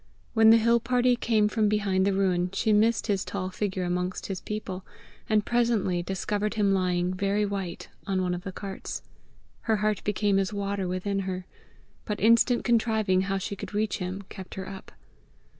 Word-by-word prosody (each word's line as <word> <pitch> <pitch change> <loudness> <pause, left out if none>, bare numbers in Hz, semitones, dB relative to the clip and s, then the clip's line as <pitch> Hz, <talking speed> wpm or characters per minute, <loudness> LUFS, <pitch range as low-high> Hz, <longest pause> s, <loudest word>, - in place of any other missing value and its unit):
When 220 -1 +6
the 225 - +8
hill 235 +1 +4
party 245 +1 +2
came 220 -3 +2
from 210 0 +1
behind 200 -2 +1
the 200 - +2
ruin, 185 -2 +1
she 215 +2 +2
missed 220 +2 +3
his 200 -2 0
tall 185 -1 -4
figure 190 -1 -2
amongst 180 +1 -2
his 190 -2 -4
people, 195 -3 -5 0.5
and 215 -2 +3
presently 230 -7 +1
discovered 205 +4 -2
him 205 -2 +2
lying 180 -1 +1
very 200 +2 0
white 195 -3 -4 0.2
on 190 -1 0
one 180 -1 0
of 175 - -4
the 195 - -6
carts. 195 0 -6 0.7
Her 220 - +5
heart 210 -1 0
became 205 -1 +1
as 195 0 -1
water 200 -2 -2
within 185 +2 -2
her. 185 -1 -4 0.6
But 210 -2 -3
instant 230 +3 +4
contriving 220 -5 +2
how 195 +1 -1
she 195 +1 -4
could 205 - -8
reach 215 -1 0
him, 185 +2 -4
kept 190 -2 -9
her 190 0 -5
up. 190 0 -9
200 Hz, 180 wpm, -27 LUFS, 185-215 Hz, 0.7 s, the